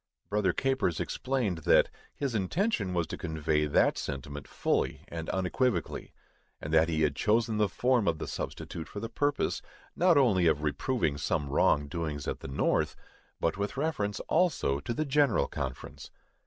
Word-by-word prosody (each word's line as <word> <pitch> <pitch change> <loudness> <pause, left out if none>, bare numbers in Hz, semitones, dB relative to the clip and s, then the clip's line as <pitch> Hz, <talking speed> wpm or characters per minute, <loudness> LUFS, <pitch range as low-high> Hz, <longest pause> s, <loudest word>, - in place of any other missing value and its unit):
_ - - -42
Brother 105 -3 +2
Capers 130 -8 0
explained 120 -10 -1
that 75 - +4 0.2
his 140 -4 -2
intention 105 - 0
was 85 -2 +1
to - - -7
convey 80 -2 0
that 70 - +3
sentiment 70 +1 -5
fully - - -1
and 80 -1 -5
unequivocally; 95 - -1 0.5
and 75 - -5
that 80 +1 +5
he 80 -1 +1
had 75 -2 +1
chosen 110 +4 +2
the 105 -2 +2
form 125 +1 +2
of 80 -2 +2
the - - -4
substitute 80 - -5
for 105 - -7
the 115 +2 -5
purpose, 145 +3 0 0.3
not 175 -2 +4
only 100 -11 +4
of 75 -2 +2
reproving 75 - 0
some 75 -2 -1
wrong 70 +1 +3
doings 75 -2 -4
at - - -2
the - - -8
North, 65 - +1 0.4
but 80 - 0
with 105 +6 -2
reference 120 -9 -1
also 155 - +1
to 75 - -5
the 155 - 0
General 145 0 +3
Conference. 65 -2 -6
95 Hz, 170 wpm, -30 LUFS, 75-125 Hz, 0.5 s, that